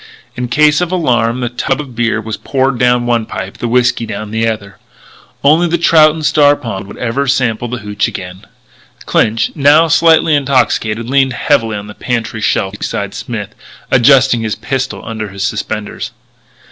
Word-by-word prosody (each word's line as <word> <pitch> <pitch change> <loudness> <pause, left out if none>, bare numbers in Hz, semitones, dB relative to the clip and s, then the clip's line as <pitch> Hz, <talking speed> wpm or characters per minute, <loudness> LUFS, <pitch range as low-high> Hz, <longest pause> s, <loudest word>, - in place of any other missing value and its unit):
In 125 0 -3
case 150 +5 +3
of 180 0 -2
alarm 125 -8 0
the 120 - -1
tub 130 +3 -2
of 135 -5 -8
beer 115 -1 0
was 110 -1 -5
poured 130 -2 -1
down 125 -1 +2
one 120 -2 0
pipe; 95 +1 -7
the 120 - -2
whiskey 120 -1 +1
down 105 0 -6
the 110 +1 0
other. 100 -3 -5 0.6
Only 155 +5 +4
the 170 +1 0
trout 155 -2 +5
in 160 - -6
Star 145 -1 +4
Pond 100 -7 -6
would - - -11
ever 125 +4 -2
sample 125 -3 0
that 120 0 -5
hootch 105 0 -1
again. 90 +2 -8 0.6
Clinch, 115 +1 +1
now 150 +2 +4
slightly 160 0 +4
intoxicated, 120 -5 +1
leaned 135 0 +2
heavily 115 -5 0
on 100 - -7
the 105 - -10
pantry 115 -2 -3
shelf 95 -1 -1
beside 100 -1 -4
Smith, 105 -1 -6 0.4
adjusting 130 -1 +4
his 110 -1 -2
pistol 135 -1 -4
under 110 -2 -5
his 95 0 -5
suspenders. 105 0 -4
120 Hz, 170 wpm, -14 LUFS, 110-140 Hz, 0.6 s, trout